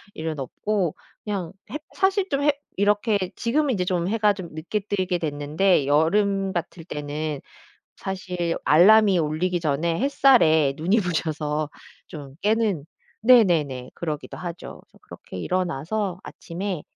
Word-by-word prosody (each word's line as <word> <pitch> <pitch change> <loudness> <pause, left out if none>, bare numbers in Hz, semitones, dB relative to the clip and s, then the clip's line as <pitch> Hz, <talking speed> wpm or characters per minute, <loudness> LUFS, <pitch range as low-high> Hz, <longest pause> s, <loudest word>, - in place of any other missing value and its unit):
일은 160 -1 -4
없고 180 - -2 0.3
그냥 195 -6 -4 0.2
햇 300 - -5
사실 385 0 +2
좀 280 -1 0
햇 295 -1 +3 0.2
이렇게 205 +1 +2 0.2
지금은 270 +3 +1
이제 180 -3 -1
좀 180 -1 0
해가 210 -2 +3
좀 185 -4 -8
늦게 175 +7 -3
뜨게 190 -3 -1
됐는데 150 +1 +1
여름 195 +6 +2
같을 170 -1 -4
때는 150 -1 -4 0.6
사실 180 -3 -3
알람이 195 +5 +6
울리기 170 +3 0
전에 165 +3 0
햇살에 200 - +4
눈이 185 +8 +2
부셔서 155 -4 -2 0.4
좀 140 -4 -9
깨는 210 -7 +1 0.4
네네네 170 - +4
그러기도 155 -4 -5
하죠. 175 -1 -7
그래서 - - -25
그렇게 - - -11
일어나서 180 - -2
아침에 180 -1 -5
180 Hz, 280 characters per minute, -24 LUFS, 155-205 Hz, 0.6 s, 알람이